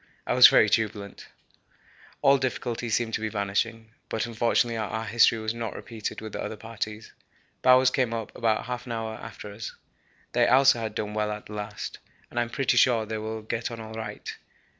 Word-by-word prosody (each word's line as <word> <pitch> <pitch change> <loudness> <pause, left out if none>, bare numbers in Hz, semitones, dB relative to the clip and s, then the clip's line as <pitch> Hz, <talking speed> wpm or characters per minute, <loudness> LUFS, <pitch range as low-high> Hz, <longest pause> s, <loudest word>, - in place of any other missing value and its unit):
I - - 0
was - - +10
very - - +5
jubilant; 105 -2 -1 1.0
all 140 0 +6
difficulties 120 -3 -2
seemed 115 -2 -1
to - - -1
be 110 - -1
vanishing; 110 +2 -2 0.2
but 110 - -1
unfortunately 115 0 +1
our 110 0 -3
history 115 +1 +4
was 110 0 -2
not 115 -2 -5
repeated 110 -2 -6
with 110 -1 -7
the - - -4
other - - -4
parties. 110 0 -6 0.5
Bowers 130 0 +6
came 130 -3 +1
up 115 -2 -5
about 110 -2 +1
half 125 +1 -5
an 120 - -3
hour 110 -1 -3
after 105 -2 -9
us. 110 +2 -7 0.6
They - - +3
also 135 0 +6
had 110 -2 -4
done 105 0 -3
well 105 0 0
at 105 0 -6
the 105 - -10
last, 105 0 -6 0.3
and 120 - -2
I'm 120 -1 0
pretty 125 0 +1
sure 120 -3 +4
they 110 0 -4
will 110 0 -5
get 115 +1 -3
on 115 -1 -7
all 110 0 -8
right. 110 0 -6
110 Hz, 195 wpm, -27 LUFS, 110-120 Hz, 1.0 s, was